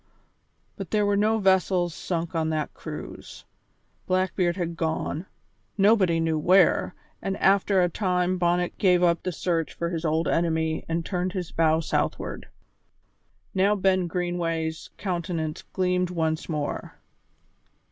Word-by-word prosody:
But 195 Hz, -3 st, -6 dB
there 210 Hz, -1 st, +2 dB
were 205 Hz, 0 st, +2 dB
no 215 Hz, +2 st, +2 dB
vessels 190 Hz, -3 st, +2 dB
sunk 170 Hz, -1 st, -3 dB
on 160 Hz, -1 st, 0 dB
that 155 Hz, -1 st, -2 dB
cruise. -, -, -9 dB, 0.6 s
Blackbeard 185 Hz, -1 st, +1 dB
had 170 Hz, -2 st, -2 dB
gone, 160 Hz, +1 st, -2 dB, 0.5 s
nobody 195 Hz, -5 st, +4 dB
knew 160 Hz, -1 st, 0 dB
where, 180 Hz, +2 st, +4 dB, 0.3 s
and 195 Hz, 0 st, -2 dB
after 195 Hz, -1 st, +3 dB
a -, -, +3 dB
time 180 Hz, 0 st, 0 dB
Bonnet 175 Hz, 0 st, 0 dB
gave 180 Hz, -2 st, +4 dB
up 170 Hz, -1 st, +3 dB
the 185 Hz, -, -2 dB
search 165 Hz, -1 st, -1 dB
for 170 Hz, 0 st, -2 dB
his 165 Hz, -1 st, -3 dB
old 160 Hz, +1 st, +1 dB
enemy 160 Hz, -1 st, 0 dB
and 165 Hz, 0 st, -1 dB
turned 180 Hz, -1 st, -2 dB
his 180 Hz, -3 st, -4 dB
bow 160 Hz, 0 st, +2 dB
southward. 165 Hz, -, -2 dB, 1.1 s
Now 195 Hz, +2 st, +3 dB
Ben 185 Hz, -2 st, +2 dB
Greenway's 165 Hz, -2 st, -2 dB
countenance 170 Hz, -4 st, -3 dB
gleamed 180 Hz, -1 st, +1 dB
once 160 Hz, -2 st, -2 dB
more. 150 Hz, -3 st, -3 dB
175 Hz, 135 wpm, -26 LUFS, 165-185 Hz, 1.1 s, nobody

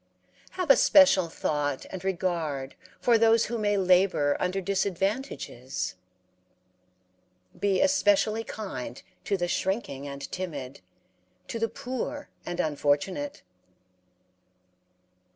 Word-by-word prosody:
Have 360 Hz, -6 st, +3 dB
a -, -, +9 dB
special 240 Hz, -, +6 dB
thought 145 Hz, -3 st, -2 dB
and 190 Hz, -1 st, -6 dB
regard 170 Hz, -8 st, -2 dB, 0.3 s
for 235 Hz, -2 st, +4 dB
those 225 Hz, 0 st, +5 dB
who 235 Hz, -1 st, -3 dB
may 205 Hz, -1 st, +1 dB
labor 180 Hz, -6 st, +3 dB
under 185 Hz, +2 st, 0 dB
disadvantages? 195 Hz, -, -2 dB, 1.7 s
be 200 Hz, -2 st, +2 dB
especially 225 Hz, -6 st, +3 dB
kind 130 Hz, -, -6 dB, 0.2 s
to 200 Hz, -, +1 dB
the 175 Hz, -1 st, -1 dB
shrinking 175 Hz, -, -2 dB
and 140 Hz, 0 st, -7 dB
timid, 145 Hz, -8 st, -5 dB, 0.7 s
to 230 Hz, -, -3 dB
the 225 Hz, 0 st, 0 dB
poor 260 Hz, +4 st, -5 dB, 0.2 s
and 175 Hz, 0 st, -4 dB
unfortunate. 155 Hz, -, 0 dB
190 Hz, 100 wpm, -27 LUFS, 150-225 Hz, 1.7 s, a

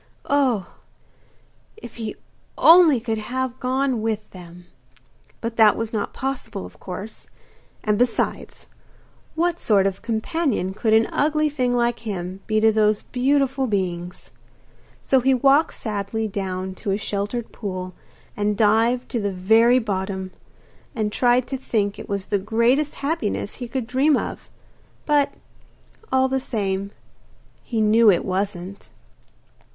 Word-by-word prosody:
Oh, 255 Hz, -10 st, +1 dB, 1.0 s
if 415 Hz, -, -11 dB
he 220 Hz, -2 st, -5 dB, 0.4 s
only 330 Hz, -6 st, +7 dB
could 225 Hz, -1 st, -2 dB
have 255 Hz, +3 st, -3 dB
gone 260 Hz, -2 st, 0 dB
with 215 Hz, -1 st, -2 dB
them! 175 Hz, -1 st, -12 dB, 0.8 s
But 230 Hz, 0 st, -4 dB
that 220 Hz, -2 st, +6 dB
was 225 Hz, 0 st, -4 dB
not 210 Hz, -2 st, -2 dB
possible, 260 Hz, -7 st, -4 dB
of -, -, -14 dB
course; 195 Hz, +4 st, -8 dB, 0.5 s
and 210 Hz, -1 st, +1 dB
besides, 245 Hz, -1 st, -1 dB, 0.7 s
what 340 Hz, +1 st, 0 dB
sort 200 Hz, -3 st, +3 dB
of 195 Hz, -1 st, -2 dB
companion 230 Hz, -, -1 dB
could 220 Hz, +2 st, 0 dB
an 220 Hz, +1 st, +5 dB
ugly 305 Hz, +1 st, +1 dB
thing 250 Hz, -4 st, 0 dB
like 240 Hz, 0 st, +1 dB
him 190 Hz, -4 st, -5 dB
be 215 Hz, 0 st, +2 dB
to 220 Hz, 0 st, +5 dB
those 215 Hz, -1 st, +2 dB
beautiful 270 Hz, +1 st, +1 dB
beings? 180 Hz, -4 st, -3 dB, 0.7 s
So 265 Hz, -, +3 dB
he 260 Hz, +1 st, +3 dB
walked 275 Hz, +5 st, +3 dB
sadly 215 Hz, 0 st, -3 dB
down 190 Hz, -2 st, -4 dB
to -, -, -3 dB
a 195 Hz, -, +1 dB
sheltered 205 Hz, +3 st, -3 dB
pool 185 Hz, -3 st, -5 dB, 0.4 s
and 210 Hz, 0 st, 0 dB
dived 230 Hz, +4 st, +2 dB
to 235 Hz, -, -1 dB
the 205 Hz, -2 st, -1 dB
very 220 Hz, +6 st, +4 dB
bottom, 190 Hz, -4 st, -3 dB, 0.6 s
and 215 Hz, -2 st, -1 dB
tried 245 Hz, +2 st, +2 dB
to 270 Hz, -, -2 dB
think 205 Hz, -6 st, -1 dB
it -, -, -9 dB
was 200 Hz, -1 st, -2 dB
the 205 Hz, -, 0 dB
greatest 235 Hz, +8 st, +1 dB
happiness 280 Hz, -10 st, -2 dB
he 245 Hz, -, -6 dB
could 250 Hz, 0 st, -3 dB
dream 270 Hz, +5 st, +2 dB
of. -, -, -5 dB, 0.6 s
But, 290 Hz, -2 st, +2 dB, 0.8 s
all 260 Hz, 0 st, +3 dB
the 265 Hz, 0 st, 0 dB
same, 200 Hz, -6 st, -2 dB, 0.7 s
he 225 Hz, -3 st, -2 dB
knew 215 Hz, +1 st, +5 dB
it 180 Hz, -, +3 dB
wasn't! 190 Hz, 0 st, -4 dB
220 Hz, 140 wpm, -22 LUFS, 200-255 Hz, 1.0 s, only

